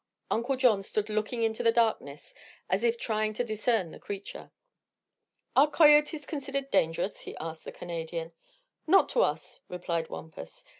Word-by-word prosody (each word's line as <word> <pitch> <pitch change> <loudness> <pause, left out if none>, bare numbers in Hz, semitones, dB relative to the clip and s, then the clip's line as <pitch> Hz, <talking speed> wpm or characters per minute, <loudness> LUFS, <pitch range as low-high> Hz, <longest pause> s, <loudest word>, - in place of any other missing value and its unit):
Uncle 240 +4 +1
John 245 -6 +4
stood 210 +2 -2
looking 215 +2 -1
into 220 -1 0
the 230 - +4
darkness 220 - 0 0.4
as 190 +4 +1
if 235 0 +2
trying 215 -2 -1
to 230 - -1
discern 220 -5 0
the - - -11
creature. 200 -1 -7 1.1
"Are 285 +3 +6
coyotes 295 -1 +5
considered 275 -2 -4
dangerous?" 165 +5 +1
he - - -9
asked 160 0 -7
the - - -6
Canadian. 165 -1 -5 0.6
"Not 385 +5 +5
to - - +2
us," - - -1
replied 170 -2 -3
Wampus. 155 - -9
215 Hz, 150 wpm, -29 LUFS, 175-255 Hz, 1.1 s, Are